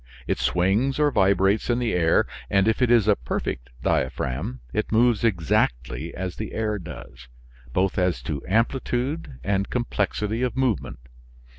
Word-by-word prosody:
It -, -, -1 dB
swings 100 Hz, +10 st, +1 dB
or 150 Hz, -1 st, +3 dB
vibrates 95 Hz, +1 st, +2 dB
in 120 Hz, -, +2 dB
the 120 Hz, -3 st, 0 dB
air, 85 Hz, -2 st, +3 dB, 0.2 s
and 100 Hz, +1 st, +3 dB
if 110 Hz, +3 st, +1 dB
it 125 Hz, -, +4 dB
is 115 Hz, -4 st, +4 dB
a 105 Hz, -, +5 dB
perfect 60 Hz, -3 st, -4 dB
diaphragm 65 Hz, 0 st, -1 dB
it 110 Hz, -, -1 dB
moves 115 Hz, 0 st, +3 dB
exactly 80 Hz, -, 0 dB
as 95 Hz, -1 st, -4 dB
the 110 Hz, -, -5 dB
air 105 Hz, -2 st, -1 dB
does, 80 Hz, -7 st, -10 dB, 0.4 s
both 95 Hz, +6 st, +1 dB
as 90 Hz, -9 st, 0 dB
to 70 Hz, +2 st, -3 dB
amplitude 125 Hz, -, -1 dB
and 100 Hz, 0 st, 0 dB
complexity 110 Hz, -1 st, -1 dB
of 125 Hz, 0 st, -1 dB
movement. 130 Hz, -6 st, 0 dB
100 Hz, 150 wpm, -24 LUFS, 90-120 Hz, 0.4 s, a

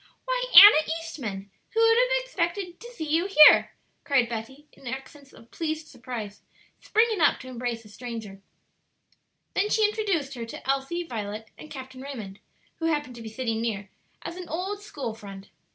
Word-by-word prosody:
"Why, -, -, -1 dB
Anna 320 Hz, -6 st, +10 dB
Eastman, 215 Hz, -, -7 dB, 0.2 s
who -, -, +2 dB
would 455 Hz, 0 st, +5 dB
have -, -, +2 dB
expected 355 Hz, -4 st, -3 dB
to 475 Hz, -, -10 dB
see 325 Hz, -10 st, -6 dB
you 325 Hz, +5 st, +1 dB
here?" 305 Hz, -6 st, +7 dB, 0.3 s
cried 265 Hz, -5 st, +2 dB
Betty, 240 Hz, +6 st, -7 dB
in 265 Hz, -, -14 dB
accents 270 Hz, +3 st, -8 dB
of 230 Hz, -, -18 dB
pleased 315 Hz, -1 st, -4 dB
surprise, 225 Hz, -4 st, -7 dB, 0.4 s
springing 440 Hz, -3 st, +1 dB
up -, -, +4 dB
to 255 Hz, -, -11 dB
embrace 240 Hz, -2 st, -4 dB
the 210 Hz, -, -16 dB
stranger. 220 Hz, -3 st, -8 dB, 1.1 s
Then 410 Hz, +2 st, +1 dB
she 435 Hz, -1 st, +3 dB
introduced 390 Hz, -10 st, -2 dB
her 235 Hz, -3 st, -6 dB
to 230 Hz, -, -10 dB
Elsie, 275 Hz, +6 st, -1 dB
Violet, 215 Hz, -6 st, -6 dB
and 310 Hz, -, -12 dB
Captain 260 Hz, -2 st, -9 dB
Raymond, 225 Hz, -8 st, -8 dB, 0.4 s
who 325 Hz, -, -2 dB
happened 295 Hz, -5 st, -1 dB
to -, -, -9 dB
be 225 Hz, -, -7 dB
sitting 225 Hz, -1 st, -3 dB
near, 205 Hz, -4 st, -3 dB, 0.3 s
as 345 Hz, -, -6 dB
an 365 Hz, -1 st, -8 dB
old 380 Hz, +6 st, -4 dB
school 280 Hz, -, -6 dB
friend. 200 Hz, -3 st, -11 dB
275 Hz, 170 wpm, -26 LUFS, 230-350 Hz, 1.1 s, Anna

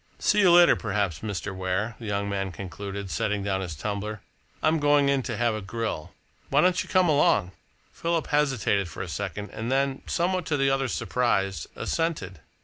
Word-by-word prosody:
See -, -, +2 dB
you 195 Hz, -3 st, +6 dB
later, 175 Hz, 0 st, +7 dB
perhaps, 100 Hz, -, -1 dB
Mr. 100 Hz, -2 st, -4 dB
Ware," 95 Hz, +4 st, -2 dB
the 115 Hz, -, -7 dB
young 100 Hz, 0 st, -1 dB
man 95 Hz, -1 st, -2 dB
concluded, 100 Hz, +2 st, -6 dB
setting 105 Hz, -1 st, -1 dB
down 95 Hz, -1 st, -1 dB
his 85 Hz, -4 st, -5 dB
tumbler. 105 Hz, +4 st, -4 dB, 0.4 s
"I'm 155 Hz, +1 st, +3 dB
going 145 Hz, -1 st, +4 dB
in 140 Hz, -1 st, +2 dB
to 120 Hz, -3 st, -4 dB
have 120 Hz, -1 st, +2 dB
a 110 Hz, -, -4 dB
grill. 105 Hz, -5 st, -4 dB, 0.4 s
Why 140 Hz, +2 st, +4 dB
don't 180 Hz, +1 st, +3 dB
you -, -, -8 dB
come 185 Hz, -2 st, +4 dB
along?" 105 Hz, -, +3 dB, 0.4 s
Philip 165 Hz, -1 st, -1 dB
hesitated 130 Hz, -10 st, +1 dB
for 80 Hz, -, -6 dB
a -, -, -6 dB
second 100 Hz, +3 st, -5 dB
and 115 Hz, +3 st, -4 dB
then, 135 Hz, 0 st, +1 dB
somewhat 180 Hz, 0 st, 0 dB
to 150 Hz, -, +1 dB
the 135 Hz, 0 st, +2 dB
other's 135 Hz, -2 st, 0 dB
surprise, 95 Hz, -10 st, 0 dB
assented. 150 Hz, -, -2 dB
110 Hz, 185 wpm, -26 LUFS, 95-140 Hz, 0.4 s, later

